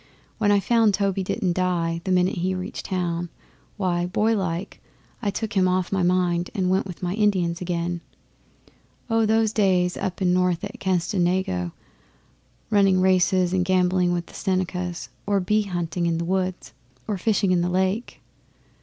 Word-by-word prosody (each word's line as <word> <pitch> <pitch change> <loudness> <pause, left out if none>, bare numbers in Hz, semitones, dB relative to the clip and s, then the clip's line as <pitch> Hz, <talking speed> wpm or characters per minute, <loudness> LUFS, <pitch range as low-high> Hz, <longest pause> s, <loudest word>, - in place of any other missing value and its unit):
When 205 -2 +3
I 205 - +5
found 225 -1 +3
Toby 195 -1 0
didn't 185 -1 -1
die 170 -2 0
the 190 - -1
minute 180 +1 +2
he 185 +2 0
reached 185 0 -6
town, 175 -2 -2 0.5
why, 175 -3 0
boylike, 190 -3 -1 0.4
I 210 - 0
took 215 +2 -3
him 190 -2 +3
off 185 -1 0
my 195 -1 +1
mind 175 -1 +1
and 185 -2 +1
went 190 +1 +1
with 180 -1 -9
my 180 0 -1
Indians 190 -5 +1
again. 175 -1 -2 1.1
Oh! 225 -1 +3
those 220 0 +2
days 185 -4 +2
up 190 -2 -3
north 180 -2 +1
at 215 +4 -6
Canasedago, 180 - 0 1.0
running 195 -3 +4
races 185 -1 +3
and 185 -1 +2
gambling 180 -1 +2
with 175 -1 -1
the - - -17
Senecas, 180 -2 -2 0.2
or 200 -1 +2
bee 210 +4 +2
hunting 175 -2 -2
'in 165 -1 0
the 170 - -2
woods, 185 0 -2 0.3
or 205 -3 -2
fishing 200 -2 +1
in 180 -1 +3
the 175 - 0
lake. 190 +5 -1
185 Hz, 160 wpm, -24 LUFS, 175-195 Hz, 1.1 s, I